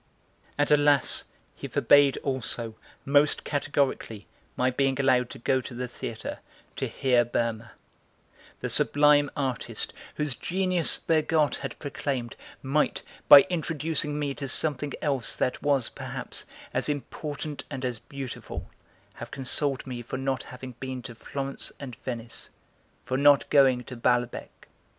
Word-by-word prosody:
And, 145 0 +1
alas, 145 -1 +4 0.3
he - - -6
forbade 145 -1 +5
also, 120 -4 -2 0.3
most 145 +2 +3
categorically, 140 -7 -1 0.3
my 125 +1 +2
being 135 +1 +1
allowed 130 -2 +3
to - - -9
go 130 +2 +1
to 120 0 -8
the 125 +1 -3
theatre, 115 -2 -6 0.4
to - - -1
hear 125 -2 +2
Berma; 115 -1 -2 0.9
the - - -1
sublime 145 0 +4
artist, 130 -3 -2 0.2
whose 150 -3 -1
genius 180 +4 +1
Bergotte 155 -2 +2
had 135 -3 -6
proclaimed, 135 -4 -3 0.3
might, 140 +3 +1 0.3
by 145 - +12
introducing 160 -3 -1
me 145 -2 -1
to 140 0 -5
something 145 +1 +1
else 135 -6 0
that 125 - -1
was, 140 -5 +1
perhaps, - - -6 0.3
as - - -1
important 150 +1 -4
and 135 -2 -4
as 120 -3 -2
beautiful, 135 -1 -7 0.4
have - - -9
consoled 135 +1 0
me 125 -2 -5
for 120 - -5
not 135 -2 -1
having 125 0 -9
been 130 -1 -5
to 120 - -7
Florence 135 +4 -5
and 130 -4 -7
Venice, 115 -2 -6 0.6
for 130 - -1
not 145 0 +5
going 130 -3 +5
to 125 - -9
Balbec. 120 0 -1
135 Hz, 135 wpm, -27 LUFS, 125-145 Hz, 0.9 s, by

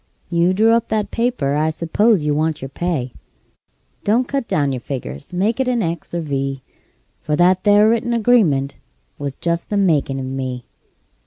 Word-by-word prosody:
You 170 +1 +3
drew 220 +3 +4
up 230 0 +2
that 215 -2 -1
paper 230 - 0
I 155 +2 +1
s'pose 170 +4 +1
you 150 - +1
want 155 +1 0
your 135 - -6
pay. 140 -5 -3 0.9
Don't 235 +5 +2
cut 275 -4 -2
down 145 -2 +1
your 130 - -3
figures; 115 - -6
make 205 +7 0
it 265 - +1
an 245 -3 +1
X 165 -1 -4
or - - 0
a - - -2
V; 135 -3 -3 0.6
For 150 - -1
that 180 +3 +4
'ere 205 +1 +6
written 235 +1 +1
agreement 205 - +2 0.4
was 140 -2 -4
just 170 0 -2
the 205 - 0
makin' 150 -8 +1
of 130 - -4
me. 130 -2 -4
170 Hz, 180 wpm, -19 LUFS, 140-220 Hz, 0.9 s, ere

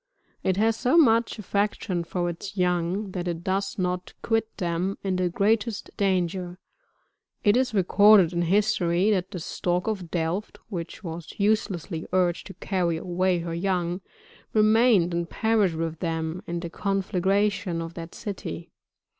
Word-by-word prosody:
It 190 0 0
has 225 +2 +2
so 255 +7 +2
much 230 -8 +4
affection 200 -3 -1
for 175 +1 -2
its 190 +4 -6
young 180 +2 0
that 180 -1 -4
it 170 -1 -3
does 195 +2 -1
not 180 -1 -2
quit 225 -1 0
them 180 +1 -1
in 190 -2 0
the 180 -1 +1
greatest 215 +4 0
danger; 180 -2 0 0.9
it 205 -1 +5
is 250 -3 +1
recorded 200 -1 +6
in 170 - 0
history, 190 0 +2
that 185 -3 0
the 195 - -6
Stork 175 +2 -1
of 195 -6 -3
Delft, 170 +5 -2
which 175 0 -6
was 165 -1 -7
uselessly 200 -5 0
urged 180 -2 +1
to 195 - -10
carry 175 -4 -1
away 180 +2 0
her 165 0 -4
young, 180 0 -1 0.5
remained 215 -4 +4
and 170 0 -2
perished 215 -6 +2
with 165 0 -3
them 165 +1 -2
in 170 0 -3
the 170 - -5
conflagration 195 -1 0
of 165 0 -5
that 165 0 -8
city. 185 - -6
185 Hz, 150 wpm, -26 LUFS, 170-205 Hz, 0.9 s, recorded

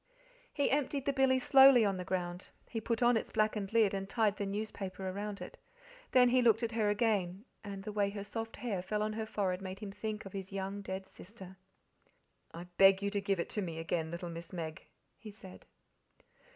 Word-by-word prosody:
He 285 - 0
emptied 280 0 0
the 280 - +1
billy 265 -1 +3
slowly 265 -2 +7
on 200 -1 +1
the 180 - -4
ground, 180 -1 -3 0.2
he 225 - -4
put 230 +2 -1
on 240 0 +5
its 225 - -1
blackened 215 -2 0
lid 225 -3 +3
and 195 0 -3
tied 215 -3 +2
the 200 - -2
newspaper 195 -2 -4
around 200 +2 -4
it. - - -9 0.5
Then 250 -1 +6
he 255 +1 +4
looked 230 -1 +4
at 230 - -1
her 220 -2 +1
again, 205 -2 0 0.2
and 200 -2 -7
the 210 - -5
way 205 -1 +1
her 200 0 -6
soft 225 +2 -5
hair 215 -7 -3
fell 210 +3 -2
on 215 0 -2
her 220 0 -4
forehead 190 -3 -1
made 190 0 -6
him 205 -1 -7
think 215 +1 -5
of 195 - -9
his 195 -1 -6
young 195 +1 -4
dead 190 -1 -5
sister. 190 0 -12 1.0
"I 170 - -8 0.2
BEG 195 0 +7
you 200 - +1
to 200 -1 -1
give 195 -2 0
it - - -2
to 210 - -2
me 170 -4 -4
again, 165 0 -2
little 170 +1 -5
Miss 165 0 -8
Meg," 165 -3 -6 0.3
he 215 - -10
said. 195 -3 -13
200 Hz, 210 wpm, -33 LUFS, 190-225 Hz, 1.0 s, slowly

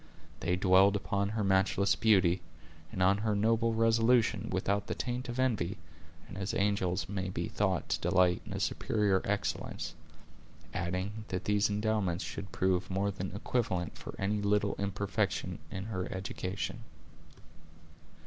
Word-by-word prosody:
They 90 - +1
dwelled 95 +2 +5
upon 100 0 -1
her 110 0 -1
matchless 95 +1 +3
beauty, 95 -5 +4 0.5
and 95 - 0
on 100 +2 +4
her 110 -1 0
noble 115 +2 +2
resolution, 115 -1 +3
without 100 +2 0
the - - -2
taint 125 +1 -3
of 120 - -4
envy, 110 -8 0 0.5
and 95 - -8
as 95 0 -2
angels 100 -3 +1
may 95 -2 -3
be - - -3
thought - - 0
to - - +1
delight 90 -1 +3
in - - -7
a - - -3
superior 100 -3 +1
excellence; - - -2 0.8
adding, 95 +5 -3
that 90 - -4
these 105 0 +2
endowments 105 -4 0
should 100 -2 -6
prove 95 0 +1
more 100 +2 0
than 95 0 -5
equivalent 100 -6 -1
for - - -8
any 105 +2 0
little 100 0 +2
imperfection 100 -2 -1
in 95 0 -5
her 95 -4 -4
education. 95 0 -4
100 Hz, 145 wpm, -31 LUFS, 95-105 Hz, 0.8 s, dwelled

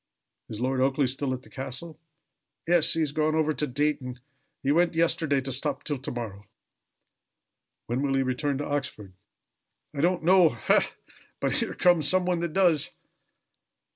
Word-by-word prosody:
"Is 110 - -6
Lord 130 +1 0
Oakleigh 135 +1 +2
still 135 +2 -2
at 130 0 -4
the - - -16
castle?" 140 +4 -6 0.7
"Yes. 170 -2 +4
He 165 - +1
has 150 -3 0
gone 155 +1 0
over 155 -1 +1
to 150 - -1
Dayton 130 -2 -1 0.4
he 135 - +2
went 170 +2 +2
yesterday 160 -4 +2
to 135 +1 -5
stop 140 +1 -3
till 145 -3 -3
to 130 - -5
morrow." 105 -4 -7 1.4
"When 120 +3 -2
will 140 -1 0
he 135 - +2
return 135 +2 -1
to 145 - -3
Oxford?" 110 -9 -3 0.8
"I 140 - -3
don't 175 +1 +1
know. 180 -1 +6
Ha! - - +1 0.5
but - - 0
here - - 0
comes 175 -5 +3
somebody 180 -2 +1
that 170 -2 -3
does." 175 -6 +4
145 Hz, 165 wpm, -27 LUFS, 130-165 Hz, 1.4 s, know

